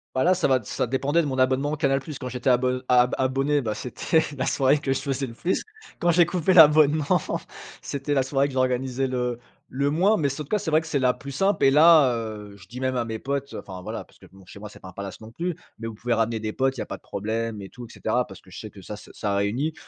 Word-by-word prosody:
Bah 130 - +2
là, 180 - +5
ça 185 -1 +1
va 130 -1 +3
ça - - -2
dépendait 140 +6 +1
de 150 - -2
mon 130 -1 -3
abonnement 130 +3 +1
Canal 135 -2 +1
Plus. 150 0 -8
Quand 125 - -6
j'étais 125 +1 -1
abo 125 +1 +2
ab 125 0 +4
abonné, 135 +3 +1
bah 110 -4 -3
c'était 130 +6 0 0.2
la - - -1
soirée 140 +2 +3
que 140 -2 -2
je 135 - 0
faisais 135 -1 -2
le 115 - -9
plus. 175 +9 -1 0.4
Quand 175 - +1
j'ai 170 0 +5
coupé 180 +1 +1
l'abonnement, 155 -2 +6 0.6
c'était 140 +1 -3
la 135 - +3
soirée 135 +1 +1
que 140 - -8
j'organisais 130 0 0
le 125 -2 -2 0.3
le 140 +2 0
moins, 190 +8 +3
mais 145 -3 +1
sau 140 +3 -5
en 150 - -6
tout - - -25
cas, 210 - +2
c'est 160 -5 -4
vrai 155 +1 +4
que 160 - -11
c'est 155 - 0
la 130 -2 +3
plus 140 +2 -9
simple 195 +9 +1
et 135 - +7
là, 150 -1 +6
heu, 105 -3 -6
je 90 -2 -16
dis 125 +4 -9
même 130 0 -1
à 120 - 0
mes 110 -1 -5
potes, 140 +2 -3
enfin, 90 -1 -8
voilà, - - -5
parce - - -25
que, - - -17
bon, 95 0 -17
chez - - -12
moi, 105 +1 -8
c'est - - -14
pas 95 - -12
un 90 - -13
palace, 100 +2 -7
non 110 - -10
plus, 175 +7 -3 0.2
mais 115 +1 -6
vous 115 - -6
pouvez 120 +2 -1
ramener 115 0 0
des 110 0 -4
potes, 135 0 0
il - - -8
y'a - - -4
pas - - -6
de - - -30
problème 110 +1 -3
et 95 - -9
tout, 125 -1 -10
et - - -15
cetera, - - 0
parce - - -13
que - - -20
je - - -11
sais - - -8
que - - -13
ça - - -7
se - - -13
ça 100 -1 -2
réunit. 120 +11 0
130 Hz, 285 wpm, -24 LUFS, 115-145 Hz, 0.6 s, et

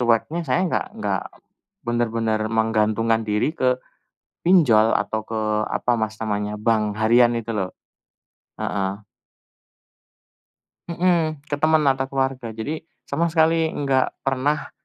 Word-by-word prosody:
cueknya 120 +8 +1
saya 130 +7 +2
enggak 180 - 0
enggak 220 - -1 0.6
benar-benar 115 -2 0
menggantungkan 110 0 +1
diri 105 +8 +1
ke 130 -5 +1 0.7
pinjol 125 -12 +5
atau 105 +2 -1
ke, 110 0 -4 0.3
apa 125 - 0
Mas 110 0 -2
namanya, 105 -1 -2
bank 110 0 +2 0.2
harian 120 +2 +5
itu 115 0 -5
loh. 95 -3 -2 0.9
Heeh. 100 0 -2 1.9
Mhm, 170 -4 0
ke 145 -1 -3
teman 155 0 +3
atau 135 -1 +2
keluarga. 135 -3 -2
Jadi 145 +8 -4 0.2
sama 160 +4 0
sekali 160 0 +3
enggak 135 -4 0
pernah 135 +3 0
120 Hz, 115 wpm, -22 LUFS, 110-150 Hz, 1.9 s, pinjol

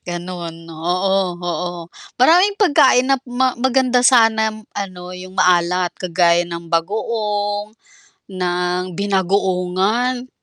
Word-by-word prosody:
ganun. 175 -1 -6
Oo, 180 +3 -1
oo. 175 0 -3 0.5
Maraming 360 +10 +4
pagkain 285 - +4
nap 270 -1 +1
ma 255 +1 +1
maganda 255 -1 +2
sana 225 -3 +4 0.2
ano 185 -3 -6
yung 185 +1 -10
maalat 180 0 +2
kagaya 175 -1 +2
ng 170 0 -8
bagoong, 205 +3 -2 0.6
ng 180 0 -1
binagoongan. 200 +5 0
190 Hz, 100 wpm, -18 LUFS, 180-235 Hz, 0.6 s, Maraming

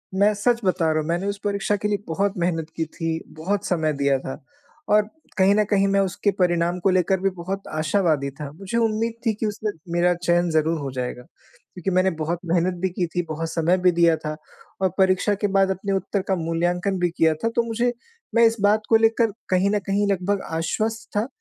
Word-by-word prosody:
मैं 205 +2 +4
सच 235 +3 +1
बता 180 -3 +1
रहा 155 - +1
हूँ 155 - -3
मैंने 175 +4 -1
उस 200 0 -3
परीक्षा 200 0 0
के 205 +1 -2
लिए 205 -1 +1
बहुत 195 +5 0
मेहनत 165 -2 -1
की 160 - -1
थी, 165 0 -3
बहुत 190 +6 -3
समय 160 -4 +1
दिया 140 -1 +2
था 135 +3 -7 0.5
और 210 0 +5 0.3
कहीं 195 +2 +5
न 210 - +4
कहीं 200 -1 +3
मैं 195 0 +2
उसके 195 +2 0
परिणाम 175 0 +1
को 195 - +2
लेकर 185 0 +2
भी 195 +1 +1
बहुत 185 +2 -6
आशावादी 155 -3 0
था। 145 -2 -5
मुझे 195 +7 -4
उम्मीद 225 0 +1
थी 225 - +3
कि 215 +2 -3
उसमें 210 0 -2 0.2
मेरा 175 +1 +3
चयन 175 0 +1
ज़रूर 160 +1 +1
हो 135 -2 -4
जाएगा। 125 -1 -4
क्योंकि 180 +2 -9
मैंने 185 +1 +4
बहुत 165 +2 -1
मेहनत 175 +1 +2
भी 190 - +1
की 180 0 -1
थी, 175 +2 -1
बहुत 165 0 -4
समय 170 +3 +2
भी 180 0 +4
दिया 170 -1 +4
था 155 0 -5 0.5
और 190 - +3
परीक्षा 190 +2 +3
के 205 - +2
बाद 195 0 +4
अपने 195 +2 -3
उत्तर 195 +1 -1
का 190 - +2
मूल्याँकन 175 +3 -1
भी 175 -1 +2
किया 160 -1 +4
था। 230 - +2
तो 235 - +3
मुझे 235 +2 0 0.4
मैं 230 0 +6
इस 225 0 +3
बात 210 +2 +4
को 225 - +5
लेकर 225 0 +3 0.2
कहीं 185 +1 +3
न 210 - +2
कहीं 200 +1 +1
लगभग 195 +1 0
आश्वस्त 220 +7 -2
था 220 +4 +1
185 Hz, 215 wpm, -23 LUFS, 165-205 Hz, 0.5 s, मैं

